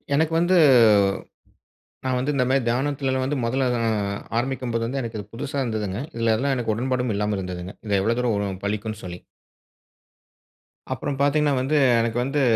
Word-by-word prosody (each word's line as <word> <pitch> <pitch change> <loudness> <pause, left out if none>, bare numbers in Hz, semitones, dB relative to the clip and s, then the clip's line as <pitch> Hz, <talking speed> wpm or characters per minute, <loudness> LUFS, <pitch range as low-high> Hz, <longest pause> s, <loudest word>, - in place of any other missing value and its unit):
எனக்கு 160 +2 +1
வந்து 175 +2 +3 1.5
நான் 130 -1 +1
வந்து 140 +4 -1
இந்த 125 - +2
மாரி 135 0 +3
தியானத்திலலாம் 130 +1 0
வந்து 140 +2 -1
1ல 130 +2 +1
நான் 115 -2 0 0.4
ஆரம்பிக்கும்போது 120 -2 -1
வந்து 135 +3 -2
எனக்கு 115 -2 -5
இது 105 0 -10
புதுசா 140 +4 -5
இருந்ததுங்க. 105 -4 -3 0.2
இதில 115 -1 +2
அதெல்லாம் 135 +5 0
எனக்கு 115 -3 -1
உடன்பாடும் 125 0 -1
இல்லாமல் 105 0 -1
இருந்ததுங்க. 90 0 -6
இது 100 -1 +2
எவ்வளோ 115 +3 +1
தூரம் 120 -3 +1
வரும்? 100 -2 -3
பலிக்குன்னு 105 +1 -3
சொல்லி. 90 -1 -7 1.7
அப்புறம் 140 -2 -4
பார்த்தீங்கன்னா 145 0 +2
வந்து, 145 +4 +1 0.2
எனக்கு 115 +1 -1
வந்து 135 +2 0
120 Hz, 160 wpm, -23 LUFS, 110-135 Hz, 1.7 s, வந்து